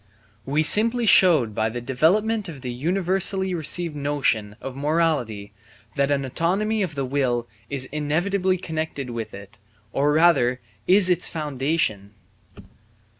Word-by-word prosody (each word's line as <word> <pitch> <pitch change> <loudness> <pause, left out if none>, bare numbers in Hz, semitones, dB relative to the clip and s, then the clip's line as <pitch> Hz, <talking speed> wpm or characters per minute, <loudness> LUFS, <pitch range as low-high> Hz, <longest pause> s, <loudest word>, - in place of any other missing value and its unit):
We 150 +3 +1
simply 230 +8 +4
showed 160 - +5
by 110 +2 0
the 120 +2 -5
development 190 - 0
of 145 -5 -9
the 125 -1 -5
universally 190 +5 0
received 165 0 -2
notion 140 -8 -1
of 135 -1 -7
morality 140 -9 -1 0.4
that 140 -1 +1
an 140 -1 0
autonomy 195 - -1
of 175 -6 -3
the 135 -1 -2
will 125 -3 -1 0.2
is 135 -2 0
inevitably 175 +7 -1
connected 155 -6 -5
with 115 -2 -5
it, 100 +3 -13 0.3
or 145 +2 +1
rather 150 -6 +3 0.3
is 185 -1 +5
its 175 - +2
foundation. 135 -9 -2
150 Hz, 130 wpm, -23 LUFS, 125-180 Hz, 0.4 s, showed